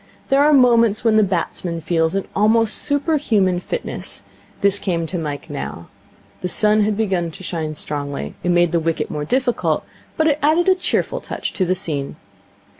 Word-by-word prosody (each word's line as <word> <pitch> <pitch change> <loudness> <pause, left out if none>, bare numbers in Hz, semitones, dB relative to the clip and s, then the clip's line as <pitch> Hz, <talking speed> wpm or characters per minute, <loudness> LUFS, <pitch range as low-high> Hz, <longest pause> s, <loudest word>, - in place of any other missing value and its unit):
There 275 +1 +4
are 300 - +5
moments 235 -6 +4
when 225 -2 +3
the 215 - +5
batsman 175 -2 -2
feels 165 +1 0
an 195 - -2
almost 220 +1 +3
super 285 +2 0
human 195 -10 +1
fitness. 485 - -4 0.4
This 200 0 +3
came 170 -4 -1
to 175 +2 -3
Mike 145 -3 -5
now. 140 - -6 0.5
The 180 - -1
sun 215 +3 +3
had 210 0 0
begun 190 -6 0
to 165 - -12
shine 160 -3 -4
strongly. 140 - -4
It 180 - -1
made 175 -1 +3
the 170 - +2
wicket 165 0 -2
more 150 -1 -3
difficult, 250 - 0 0.3
but 315 - +2
it 300 -2 +2
added 320 +5 +3
a 380 - +7
cheerful 365 -1 -1
touch - - -5
to 185 - 0
the 185 +1 +1
scene. 150 -7 -3
190 Hz, 185 wpm, -20 LUFS, 165-235 Hz, 0.5 s, a